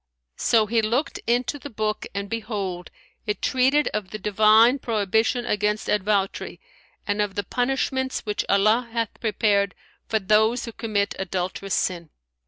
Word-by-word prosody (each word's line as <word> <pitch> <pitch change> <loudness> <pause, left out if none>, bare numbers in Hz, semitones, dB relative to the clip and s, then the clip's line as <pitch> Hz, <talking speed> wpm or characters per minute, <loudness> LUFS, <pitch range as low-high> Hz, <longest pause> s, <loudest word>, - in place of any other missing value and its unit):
So 225 -2 +3
he 225 +2 +1
looked 235 +7 -1
into 245 +5 0
the 285 - -8
book, 215 -2 -2
and 200 0 -3
behold, 200 -5 -4 0.4
it 210 - -1
treated 265 +4 +2
of 210 -3 -4
the 215 - -5
Divine 215 +5 +4
prohibition 220 +2 0
against 210 +1 0
advoutry 200 -1 0 0.5
and 205 0 0
of 205 -2 -2
the 205 - -1
punishments 260 +4 -1
which 210 -2 -2
Allah 215 +5 +3
hath 230 -2 -2
prepared 205 -2 +1 0.3
for 220 - +1
those 220 +4 +2
who 230 - -6
commit 210 -3 -1
adulterous 190 +1 -2
sin. 170 -3 -2
215 Hz, 145 wpm, -24 LUFS, 200-235 Hz, 0.5 s, Divine